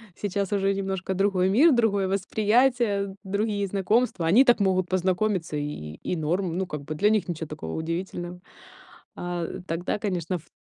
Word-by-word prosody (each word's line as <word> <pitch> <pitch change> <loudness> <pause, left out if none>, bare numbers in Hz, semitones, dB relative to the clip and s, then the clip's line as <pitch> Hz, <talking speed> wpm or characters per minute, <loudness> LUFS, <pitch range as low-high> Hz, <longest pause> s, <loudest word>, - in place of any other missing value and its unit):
Сейчас 200 -1 -2
уже 195 0 +2
немножко 190 -1 -2
другой 190 -1 +2
мир, 290 - +6
другое 205 -5 +2
восприятие, 210 +1 +1
другие 200 +1 -1
знакомства. 200 -2 +1
Они 240 +11 +6
так 240 -2 +5
могут 185 -2 +2
познакомиться, 185 -2 0
и 145 - -1
и 75 - -6 0.2
и - - 0
норм. 170 +2 -1
Ну, 190 - -1
как 150 -4 -6
бы, 150 - -5
для 205 +7 +3
них 215 -3 +1
ничё 165 -2 -4
такого 150 +1 -6
удивительного. 175 +2 -4 0.8
А, 175 -1 -3
э, - - -6
тогда, 175 +5 -2
конечно, 185 -4 -2
ф 165 - -6
т - - -27
190 Hz, 175 wpm, -26 LUFS, 175-205 Hz, 0.8 s, мир